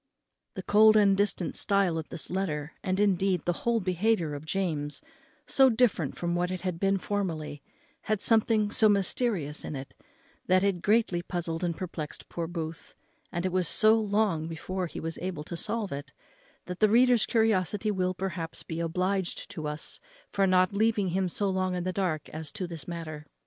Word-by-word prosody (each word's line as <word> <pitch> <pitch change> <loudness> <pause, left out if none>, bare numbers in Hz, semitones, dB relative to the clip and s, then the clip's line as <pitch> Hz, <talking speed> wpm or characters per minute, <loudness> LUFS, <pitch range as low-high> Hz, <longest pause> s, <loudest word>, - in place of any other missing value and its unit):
The - - -5
cold 215 +1 +6
and 200 -2 +5
distant 200 -3 0
stile 195 -4 +2
of 155 - -7
this 160 - -6
letter, 160 -5 -2
and, 185 0 -1
indeed, 190 -3 +2
the 175 - +2 0.2
whole 235 -1 +3
behaviour 185 -3 +1
of 145 +2 -7
James, 155 -6 -1 0.5
so 265 -1 +5
different 220 - +1
from 175 0 -1
what 175 +1 0
it 185 -1 -4
had 180 -3 -3
been 195 +1 +2
formerly, 165 -8 -3 0.4
had 215 -2 0
something 220 -1 +3
so 215 0 +4
mysterious 195 - 0
in - - -5
it, 135 0 -7 0.5
that 185 +1 +4
it 195 -3 +1
greatly 210 -4 +2
puzzled 175 -2 -4
and 170 -2 -1
perplexed 165 -4 -6
poor 170 -1 -3
Booth; 165 -1 -6 0.4
and 175 +1 -2
it 185 - 0
was 180 -2 +1
so 215 +6 +5
long 205 -7 +1
before 180 +3 -4
he - - -7
was 165 0 -4
able 175 -4 -4
to 170 - -6
solve 210 +4 -2
it, 140 0 -6 0.5
that 180 0 -6
the 215 - +5
reader's 245 +1 +4
curiosity 215 -2 +1
will, 185 -2 0
perhaps, 175 -3 -4
be 165 0 -5
obliged 180 +3 -1
to 155 -2 -5
us 150 +1 -5 0.3
for 195 -1 +2
not 185 +2 +3
leaving 210 -2 +2
him 185 +1 0
so 200 +4 -1
long 185 -1 0
in 180 - -2
the 185 +1 -2
dark 175 -6 -1
as 160 -1 -5
to 205 -3 -4
this 170 -3 -7
matter. 155 -3 -6
185 Hz, 185 wpm, -28 LUFS, 165-205 Hz, 0.5 s, cold